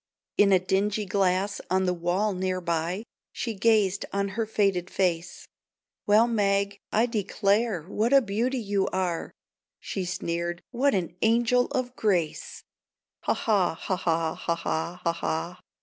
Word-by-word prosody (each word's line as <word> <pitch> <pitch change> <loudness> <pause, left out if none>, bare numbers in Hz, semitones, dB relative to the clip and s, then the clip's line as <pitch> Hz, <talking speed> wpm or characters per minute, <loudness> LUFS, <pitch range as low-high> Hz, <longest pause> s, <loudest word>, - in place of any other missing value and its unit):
In 200 -1 +5
a 190 - +7
dingy 195 +3 0
glass 195 0 0
on 190 +1 +2
the 180 - +1
wall 180 +5 0
near 185 0 -1
by 170 +3 -2 0.3
She 230 - -3
gazed 205 -2 +2
on 200 0 -1
her 220 +3 -2
faded 195 -4 +1
face. 175 -2 -1 0.6
"Well, 210 +3 +6
Meg, 200 -3 +1
I 225 +2 +3
declare, 205 -3 0
what 215 +7 -1
a 275 - +8
beauty 235 +3 -1
you 200 -4 0
are! 180 -3 -2 0.5
She 195 - -4
sneered, 175 -1 -3
"What 265 +2 +2
an 175 -2 -2
angel 240 +2 +3
of 255 -1 -3
grace! 180 -7 -1 0.6
Ha, - - +3
ha, 200 -7 +1
ha, 185 - -2
ha, 165 -3 0
ha, 170 - -2
ha, 170 +1 -3
ha, 170 - +1
ha! 80 - -3
195 Hz, 150 wpm, -27 LUFS, 180-215 Hz, 0.6 s, a